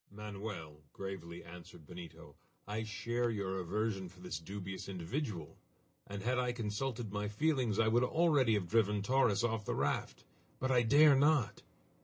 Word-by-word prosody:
"Manoel," 100 Hz, -7 st, -7 dB
gravely 85 Hz, -3 st, -6 dB
answered 85 Hz, -2 st, -12 dB
Benito, 85 Hz, -1 st, -10 dB, 0.3 s
"I 105 Hz, +2 st, -2 dB
share 120 Hz, +3 st, -1 dB
your 95 Hz, -4 st, -2 dB
aversion 95 Hz, +1 st, -1 dB
for 95 Hz, +1 st, -18 dB
this 90 Hz, -4 st, -5 dB
dubious 95 Hz, +2 st, -6 dB
individual, 95 Hz, -, -4 dB, 0.5 s
and 100 Hz, -1 st, -6 dB
had 125 Hz, +2 st, +1 dB
I 125 Hz, -1 st, 0 dB
consulted 115 Hz, 0 st, -3 dB
my 105 Hz, 0 st, -1 dB
feelings 125 Hz, -1 st, +1 dB
I 110 Hz, -, +4 dB
would 120 Hz, +3 st, +4 dB
already 145 Hz, -5 st, +3 dB
have 95 Hz, -4 st, -1 dB
driven 105 Hz, -1 st, +2 dB
Torres 120 Hz, -4 st, +3 dB
off 115 Hz, -2 st, 0 dB
the -, -, -2 dB
raft! -, -, -1 dB, 0.4 s
But 130 Hz, 0 st, 0 dB
I 125 Hz, -2 st, +5 dB
dare 145 Hz, +5 st, +7 dB
not!" 145 Hz, -3 st, +3 dB
105 Hz, 155 wpm, -35 LUFS, 95-120 Hz, 0.5 s, dare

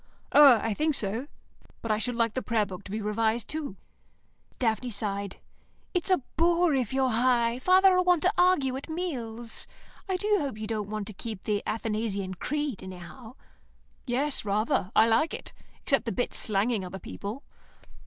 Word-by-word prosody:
"Oh, 285 Hz, -4 st, +9 dB
I 225 Hz, 0 st, -1 dB
think 305 Hz, +6 st, +1 dB
so. 225 Hz, +6 st, -2 dB, 0.6 s
But 230 Hz, -, -1 dB
I 215 Hz, -, +1 dB
should 245 Hz, +2 st, -2 dB
like 230 Hz, -2 st, +1 dB
the 260 Hz, -, -2 dB
Prayer 225 Hz, -4 st, +1 dB
Book 190 Hz, 0 st, -9 dB
to -, -, -9 dB
be 215 Hz, 0 st, -3 dB
revised, 220 Hz, +2 st, 0 dB
too." 300 Hz, -9 st, -4 dB, 0.8 s
Daphne 240 Hz, +1 st, 0 dB
sighed. 200 Hz, -2 st, -3 dB, 0.6 s
"It's 360 Hz, 0 st, 0 dB
a 370 Hz, -8 st, +3 dB
bore 340 Hz, 0 st, +3 dB
if 255 Hz, -5 st, 0 dB
you're 265 Hz, -1 st, +1 dB
High. 235 Hz, 0 st, +2 dB
Father'll 370 Hz, +3 st, +5 dB
want 360 Hz, -3 st, +3 dB
to 370 Hz, +3 st, +3 dB
argue 355 Hz, -8 st, +3 dB
at 275 Hz, -, -9 dB
meals. 240 Hz, -10 st, -4 dB, 0.4 s
I 375 Hz, -, +1 dB
do 420 Hz, +2 st, +2 dB
hope 275 Hz, -8 st, -3 dB
you 215 Hz, -, -5 dB
don't 215 Hz, -2 st, -3 dB
want 215 Hz, -1 st, -3 dB
to 215 Hz, -, -7 dB
keep 215 Hz, 0 st, -7 dB
the 205 Hz, -1 st, 0 dB
Athanasian 210 Hz, -3 st, -2 dB
Creed, 290 Hz, -, -3 dB
anyhow." 190 Hz, +7 st, -10 dB, 0.7 s
"Yes, 270 Hz, +4 st, 0 dB
rather. 205 Hz, -2 st, 0 dB
I 220 Hz, -, +7 dB
like 230 Hz, +8 st, +2 dB
it, -, -, -9 dB, 0.3 s
except 275 Hz, -2 st, +2 dB
the 230 Hz, -, -1 dB
bits 245 Hz, -, -1 dB
slanging 210 Hz, 0 st, +1 dB
other 185 Hz, +1 st, -6 dB
people." 205 Hz, +7 st, -7 dB
230 Hz, 175 wpm, -28 LUFS, 210-290 Hz, 0.8 s, Oh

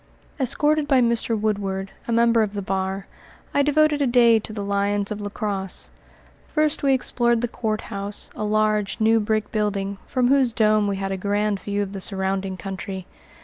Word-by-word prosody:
Escorted 295 Hz, +3 st, +2 dB
by 270 Hz, -3 st, +4 dB
Mr. 235 Hz, -2 st, +1 dB
Woodward, 195 Hz, -2 st, -2 dB, 0.2 s
a -, -, -2 dB
member 230 Hz, 0 st, +4 dB
of 210 Hz, -1 st, -1 dB
the 200 Hz, -, -3 dB
bar, 190 Hz, +1 st, -2 dB, 0.5 s
I 285 Hz, -, +3 dB
devoted 295 Hz, +1 st, +3 dB
a 280 Hz, -, +3 dB
day 235 Hz, -2 st, +5 dB
to 215 Hz, -, -8 dB
the 210 Hz, -2 st, -4 dB
lions 200 Hz, 0 st, 0 dB
of 210 Hz, 0 st, -4 dB
La 205 Hz, -, -4 dB
Crosse. 200 Hz, -3 st, -4 dB, 0.6 s
First 305 Hz, -1 st, +1 dB
we 275 Hz, -1 st, +4 dB
explored 240 Hz, -2 st, +1 dB
the 240 Hz, -, 0 dB
courthouse, 210 Hz, -3 st, -4 dB
a -, -, -4 dB
large, 215 Hz, -1 st, +1 dB
new 225 Hz, +1 st, +4 dB
brick 215 Hz, 0 st, -1 dB
building, 200 Hz, -2 st, -1 dB
from 250 Hz, -2 st, +1 dB
whose 265 Hz, -4 st, +3 dB
dome 215 Hz, -2 st, +3 dB
we 200 Hz, -, 0 dB
had 195 Hz, 0 st, -3 dB
a 195 Hz, -, -2 dB
grand 205 Hz, +1 st, 0 dB
view 205 Hz, +1 st, -2 dB
of 195 Hz, 0 st, -7 dB
the 195 Hz, -, -5 dB
surrounding 190 Hz, -1 st, -2 dB
country. 190 Hz, 0 st, -6 dB
210 Hz, 185 wpm, -23 LUFS, 200-235 Hz, 0.6 s, day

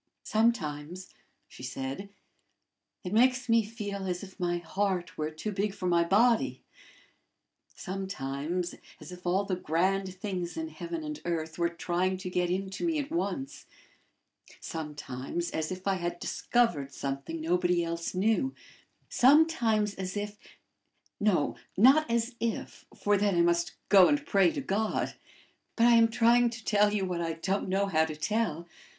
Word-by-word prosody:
"Sometimes," 180 Hz, -6 st, -1 dB, 0.4 s
she -, -, -14 dB
said, 135 Hz, +9 st, -5 dB, 0.9 s
"it 180 Hz, 0 st, -4 dB
makes 255 Hz, +3 st, +3 dB
me 230 Hz, -1 st, +4 dB
feel 205 Hz, -3 st, -5 dB
as 180 Hz, 0 st, -3 dB
if 190 Hz, -1 st, -12 dB
my 175 Hz, -1 st, 0 dB
heart 185 Hz, +1 st, -2 dB
were 155 Hz, 0 st, -2 dB
too 160 Hz, +7 st, -5 dB
big 200 Hz, 0 st, -1 dB
for 185 Hz, -, -6 dB
my 170 Hz, -1 st, +3 dB
body; 225 Hz, +6 st, +2 dB, 1.1 s
sometimes 175 Hz, -3 st, -3 dB, 0.3 s
as -, -, -10 dB
if 180 Hz, 0 st, -8 dB
all 190 Hz, +3 st, +2 dB
the 195 Hz, -2 st, -1 dB
grand 185 Hz, +3 st, 0 dB
things 185 Hz, -, -4 dB
in 320 Hz, 0 st, -3 dB
heaven 335 Hz, 0 st, -5 dB
and 300 Hz, 0 st, -6 dB
earth 160 Hz, -1 st, -3 dB
were 170 Hz, 0 st, +2 dB
trying 175 Hz, +2 st, -1 dB
to 185 Hz, -1 st, -6 dB
get 180 Hz, -1 st, 0 dB
into 190 Hz, -, -3 dB
me 330 Hz, -2 st, +1 dB
at 290 Hz, 0 st, -3 dB
once; 195 Hz, -, -3 dB, 0.9 s
sometimes 150 Hz, +1 st, -5 dB
as 160 Hz, +1 st, -2 dB
if 185 Hz, +1 st, -6 dB
I 195 Hz, -1 st, +2 dB
had 175 Hz, -1 st, -3 dB
discovered 175 Hz, -, 0 dB
something 140 Hz, +4 st, -4 dB
nobody 175 Hz, +1 st, +1 dB
else 170 Hz, +1 st, -3 dB
knew; 225 Hz, +7 st, +1 dB, 0.5 s
sometimes 245 Hz, -7 st, +4 dB
as 190 Hz, +1 st, -5 dB
if 205 Hz, 0 st, -5 dB, 0.8 s
no, 200 Hz, -8 st, +2 dB, 0.2 s
not 270 Hz, +8 st, +6 dB
as 235 Hz, +1 st, 0 dB
if, 230 Hz, -2 st, -4 dB
for 205 Hz, 0 st, +2 dB
then 200 Hz, -1 st, +1 dB
I -, -, +5 dB
must 170 Hz, 0 st, +1 dB
go 190 Hz, -2 st, +8 dB
and 290 Hz, 0 st, +1 dB
pray 195 Hz, -, +4 dB
to -, -, -3 dB
God. 215 Hz, -3 st, -1 dB, 0.6 s
But 230 Hz, -, +4 dB
I 240 Hz, -, +7 dB
am 230 Hz, -1 st, +6 dB
trying 240 Hz, +1 st, +4 dB
to 230 Hz, -1 st, -9 dB
tell 210 Hz, -1 st, +4 dB
you 205 Hz, -2 st, 0 dB
what 180 Hz, -2 st, -2 dB
I 165 Hz, -1 st, -1 dB
don't 190 Hz, +4 st, -2 dB
know 195 Hz, +2 st, +2 dB
how 160 Hz, -5 st, +2 dB
to 155 Hz, -1 st, -5 dB
tell. 170 Hz, -1 st, -1 dB
190 Hz, 155 wpm, -29 LUFS, 170-220 Hz, 1.1 s, go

